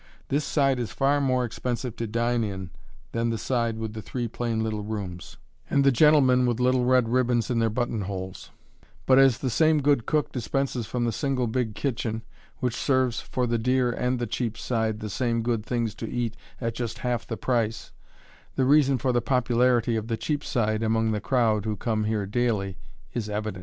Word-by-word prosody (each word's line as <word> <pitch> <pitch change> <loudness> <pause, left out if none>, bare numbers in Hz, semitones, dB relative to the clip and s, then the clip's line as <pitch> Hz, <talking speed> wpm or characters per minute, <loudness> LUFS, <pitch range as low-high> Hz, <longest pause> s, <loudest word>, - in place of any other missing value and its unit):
This 145 +2 +1
side 135 -4 +2
is 120 - -2
far 140 +1 +2
more 130 -2 +2
expensive 120 +1 -3
to 115 - -2
dine 120 +2 0
in 95 -4 -5 0.4
than 115 0 0
the 115 - -1
side 115 -2 -1
with 110 -1 -4
the 110 - -6
three 120 +4 -3
plain 115 -1 -2
little 110 -1 -2
rooms, 100 -5 -6 0.3
and 140 - +3
the 135 - +5
gentlemen 130 -2 +5
with 120 -1 0
little 125 0 +3
red 125 -2 +4
ribbons 120 -1 +1
in 120 - +1
their 115 -1 +2
buttonholes; 100 -5 -3 0.6
but 130 0 +6
as 135 -3 +5
the 130 - -2
same 155 +5 +4
good 140 -5 +2
cook 150 -2 +1
dispenses 125 -2 -2
from 120 -1 -1
the 115 - +1
single 135 -1 -1
big 115 -2 -1
kitchen, 115 -3 -2 0.4
which 125 -3 0
serves 130 -4 +1
for 125 - -2
the 120 -1 0
dear 125 +1 +2
and 125 +2 -1
the 120 - -2
cheap 115 0 -3
side 110 -3 -1
the 105 - -4
same 115 +2 -1
good 115 -2 0
things 115 -1 -1
to - - -6
eat 120 -2 -2 0.2
at 115 -2 -2
just 120 -1 -4
half 120 -2 -1
the 115 - -4
price, 115 -3 -1 0.6
the 130 - +2
reason 140 -1 +4
for 130 0 0
the 120 -1 +2
popularity 120 -1 +2
of 110 0 -2
the 115 -1 -1
"cheap 145 +6 -2
side" 110 -3 0
among 110 0 +1
the 105 -1 -1
crowd 115 -6 +2
who 110 -1 -2
come 110 +1 -1
here 105 -2 0
daily 105 -3 0 0.4
is 110 -3 -3
evident. 105 -2 -3
120 Hz, 200 wpm, -26 LUFS, 110-130 Hz, 0.6 s, but